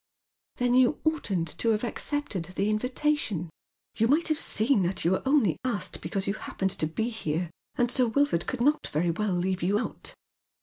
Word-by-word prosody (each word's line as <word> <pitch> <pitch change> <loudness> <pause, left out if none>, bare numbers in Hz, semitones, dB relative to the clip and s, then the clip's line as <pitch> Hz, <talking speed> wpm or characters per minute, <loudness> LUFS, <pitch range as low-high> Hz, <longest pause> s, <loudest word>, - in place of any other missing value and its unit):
"Then 245 -1 +1
you 255 +2 +4
oughtn't 205 - -1
to 230 - +2
have 215 0 +1
accepted 240 - -2
the 195 +4 -1
invitation. 235 - -1 0.4
You 225 - +2
might 310 +6 +2
have 310 - +1
seen 220 +1 +3
that 180 0 -1
you 170 - +4
were 190 - +1
only 270 - +3
asked 240 -5 -2
because 195 -2 -2
you 195 - 0
hap - - -9
pened 190 -1 +2
to 155 - +1
be 220 +9 -2
here, 170 -6 -3 0.2
and 240 0 +1
Sir 255 -2 +4
Wilford 275 - +1
could 255 -2 -3
not 295 +4 +2
very 170 +3 0
well 200 +3 -1
leave 185 +1 -1
you 195 +4 +2
out." 235 - -5
215 Hz, 190 wpm, -27 LUFS, 185-255 Hz, 0.4 s, you